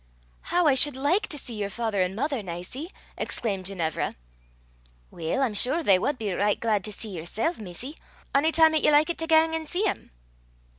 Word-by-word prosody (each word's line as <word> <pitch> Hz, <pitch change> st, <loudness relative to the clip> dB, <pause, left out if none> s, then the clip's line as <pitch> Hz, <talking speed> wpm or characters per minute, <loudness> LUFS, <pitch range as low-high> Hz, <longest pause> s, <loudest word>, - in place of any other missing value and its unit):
"How 355 Hz, 0 st, +2 dB
I 295 Hz, -, +5 dB
should 270 Hz, +1 st, +5 dB
like 345 Hz, +11 st, +1 dB
to 300 Hz, -, -3 dB
see 250 Hz, -3 st, -5 dB
your 205 Hz, -2 st, -3 dB
father 220 Hz, -2 st, -1 dB
and 185 Hz, +1 st, -1 dB
mother, 275 Hz, +1 st, -1 dB
Nicie!" 185 Hz, -, -6 dB, 0.3 s
exclaimed 195 Hz, -5 st, -2 dB
Ginevra. 170 Hz, -5 st, -2 dB, 1.0 s
"Weel, 170 Hz, +12 st, -1 dB
I'm 240 Hz, -5 st, 0 dB
sure 265 Hz, +10 st, 0 dB
they 195 Hz, -9 st, +5 dB
wad 285 Hz, +7 st, -1 dB
be 210 Hz, -5 st, -3 dB
richt 205 Hz, +3 st, +1 dB
glaid 215 Hz, -4 st, 0 dB
to 210 Hz, -, -4 dB
see 215 Hz, +2 st, -3 dB
yersel', 220 Hz, -, -2 dB
missie, 215 Hz, -, -6 dB, 0.4 s
ony 295 Hz, +4 st, +3 dB
time 320 Hz, -1 st, +5 dB
'at 310 Hz, -, +2 dB
ye -, -, +4 dB
likit 305 Hz, +3 st, +3 dB
to 325 Hz, -, -2 dB
gang 320 Hz, 0 st, +4 dB
an' 320 Hz, -1 st, -3 dB
see 360 Hz, +6 st, -1 dB
them." 415 Hz, -, -2 dB
250 Hz, 195 wpm, -26 LUFS, 200-315 Hz, 1.0 s, I